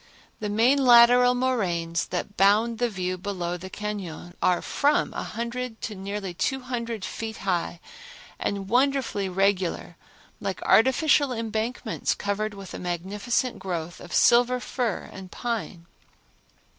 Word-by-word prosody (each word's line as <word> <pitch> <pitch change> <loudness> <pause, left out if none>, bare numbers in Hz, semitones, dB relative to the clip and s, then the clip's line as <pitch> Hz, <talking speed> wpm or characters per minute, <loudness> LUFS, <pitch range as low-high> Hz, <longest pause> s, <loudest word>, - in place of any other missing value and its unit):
The 210 - -3
main 245 +7 +3
lateral 245 0 +7
moraines 180 -10 0
that 195 +3 -4
bound 215 +4 +3
the 245 -1 +1
view 185 -3 -3
below 180 -3 -3
the 180 +1 -8
cañon 190 -5 -6
are 180 -1 +2
from 290 +1 +1
a - - -3
hundred 235 0 -5
to 220 - -4
nearly 195 -1 -5
two 265 +9 -1
hundred 235 -5 -4
feet 220 -1 -5
high 175 -2 -1 0.6
and 200 -1 -2
wonderfully 250 -5 +1
regular, 190 -1 0 0.4
like - - -3
artificial 275 +3 +4
embankments 225 0 -2
covered 205 +1 -2
with 195 -2 -9
a - - -6
magnificent 200 +8 -2
growth 175 -3 -4
of 175 - -11
silver 245 +1 +4
fir 245 -5 -3
and 190 -1 -9
pine. 225 -8 -4
210 Hz, 130 wpm, -26 LUFS, 185-245 Hz, 0.6 s, lateral